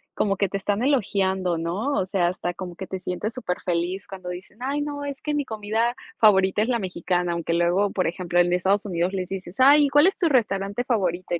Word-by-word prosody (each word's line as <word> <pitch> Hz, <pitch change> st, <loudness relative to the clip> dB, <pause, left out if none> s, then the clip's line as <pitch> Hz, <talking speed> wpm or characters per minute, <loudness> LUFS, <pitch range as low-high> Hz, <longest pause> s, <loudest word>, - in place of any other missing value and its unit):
como 195 Hz, -2 st, +1 dB
que 195 Hz, 0 st, 0 dB
te 200 Hz, -, -2 dB
están 205 Hz, +3 st, -1 dB
elogiando, 190 Hz, -, +1 dB
¿no? 185 Hz, -, -2 dB
O 190 Hz, -, +1 dB
sea, 185 Hz, -2 st, +1 dB
hasta 175 Hz, 0 st, -3 dB
como 180 Hz, -1 st, -7 dB
que 190 Hz, +2 st, -7 dB
te 190 Hz, -, -5 dB
sientes, 180 Hz, +5 st, -4 dB
superfeliz, 180 Hz, -4 st, -2 dB
cuando 185 Hz, -2 st, -9 dB
dicen: 180 Hz, +3 st, -9 dB
"Ay 280 Hz, +3 st, -1 dB
no, 290 Hz, -1 st, -4 dB
es 280 Hz, -1 st, -6 dB
que 300 Hz, -, -2 dB
mi 290 Hz, -1 st, 0 dB
comida 220 Hz, +2 st, -1 dB, 0.2 s
favorita, 190 Hz, -2 st, +4 dB
es 220 Hz, -, +1 dB
la 250 Hz, -2 st, +1 dB
mexicana". 180 Hz, -2 st, -1 dB
Aunque 170 Hz, 0 st, -2 dB
luego, 175 Hz, +4 st, +2 dB
por 185 Hz, -, -1 dB
ejemplo, 175 Hz, 0 st, -2 dB
en 175 Hz, 0 st, +3 dB
Estados 190 Hz, +4 st, +1 dB
Unidos, 180 Hz, -1 st, -1 dB
les 185 Hz, -2 st, -3 dB
dices: 190 Hz, -1 st, -6 dB
"Ay, 285 Hz, +3 st, +7 dB
¿y -, -, 0 dB
cuál 290 Hz, +4 st, +5 dB
es 390 Hz, -, 0 dB
tu 355 Hz, -, +2 dB
restaurante 205 Hz, -5 st, 0 dB
favorito? 185 Hz, -9 st, -1 dB
Y -, -, -3 dB
195 Hz, 225 wpm, -24 LUFS, 180-235 Hz, 0.2 s, Ay